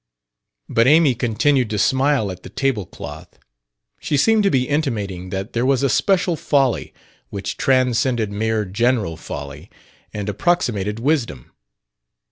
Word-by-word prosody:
But 115 Hz, +2 st, +2 dB
Amy 150 Hz, -1 st, +5 dB
continued 120 Hz, +2 st, +1 dB
to 105 Hz, -, -2 dB
smile 130 Hz, -3 st, +2 dB
at 90 Hz, -1 st, -9 dB
the -, -, -11 dB
table 135 Hz, -9 st, -1 dB
cloth. -, -, -10 dB, 0.6 s
She 145 Hz, -, -1 dB
seemed 220 Hz, +9 st, +4 dB
to 200 Hz, -, +3 dB
be 130 Hz, -6 st, +1 dB
intimating 105 Hz, -, -2 dB
that 95 Hz, +3 st, -5 dB
there 120 Hz, -, 0 dB
was 135 Hz, 0 st, +2 dB
a 140 Hz, -, +2 dB
special 180 Hz, +3 st, +2 dB
folly 135 Hz, -5 st, 0 dB, 0.4 s
which 100 Hz, -1 st, -5 dB
transcended 125 Hz, -4 st, +1 dB
mere 110 Hz, +1 st, -1 dB
general 105 Hz, -3 st, 0 dB
folly 75 Hz, -3 st, -8 dB, 0.4 s
and 105 Hz, -1 st, -5 dB
approximated 105 Hz, -, 0 dB
wisdom. 115 Hz, -, -1 dB
120 Hz, 135 wpm, -20 LUFS, 105-140 Hz, 0.6 s, Amy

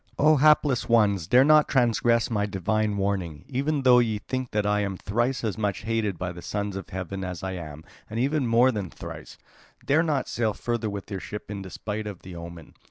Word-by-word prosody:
"O 155 Hz, +1 st, +5 dB
hapless 145 Hz, -4 st, +3 dB
ones, 100 Hz, -7 st, +3 dB
dare 125 Hz, +6 st, +6 dB
not 150 Hz, +1 st, +5 dB
to -, -, -9 dB
transgress 120 Hz, -1 st, +2 dB
my 105 Hz, -2 st, 0 dB
divine 105 Hz, +2 st, -1 dB
warning, 95 Hz, -7 st, -2 dB
even 140 Hz, +2 st, -1 dB
though 125 Hz, -1 st, +7 dB
ye 110 Hz, -3 st, +1 dB
think 130 Hz, +4 st, -4 dB
that 105 Hz, -1 st, -1 dB
I 105 Hz, 0 st, +2 dB
am 100 Hz, -2 st, -2 dB
thrice 120 Hz, +7 st, -1 dB
as 110 Hz, -3 st, -2 dB
much 100 Hz, -3 st, -1 dB
hated 110 Hz, -4 st, -1 dB
by 90 Hz, +1 st, -3 dB
the 85 Hz, 0 st, -9 dB
sons 100 Hz, +3 st, -3 dB
of 95 Hz, -, -7 dB
heaven 95 Hz, +1 st, -5 dB
as 90 Hz, 0 st, -5 dB
I 95 Hz, -, -2 dB
am, 80 Hz, -4 st, -7 dB, 0.3 s
and 110 Hz, +2 st, -4 dB
even 140 Hz, +1 st, +1 dB
more 120 Hz, +3 st, +4 dB
than 100 Hz, -6 st, -4 dB
thrice; -, -, -9 dB, 0.5 s
dare 150 Hz, +3 st, +4 dB
not 150 Hz, -6 st, 0 dB
to -, -, -9 dB
sail 110 Hz, -3 st, 0 dB
further 120 Hz, -2 st, -2 dB
with 100 Hz, +1 st, -7 dB
your 95 Hz, -, -3 dB
ship 105 Hz, +2 st, -7 dB
in 100 Hz, -1 st, -5 dB
despite 105 Hz, +3 st, -5 dB
of 100 Hz, -4 st, -8 dB
the 90 Hz, -1 st, -9 dB
omen. 85 Hz, -1 st, -10 dB
105 Hz, 220 wpm, -26 LUFS, 95-125 Hz, 0.5 s, though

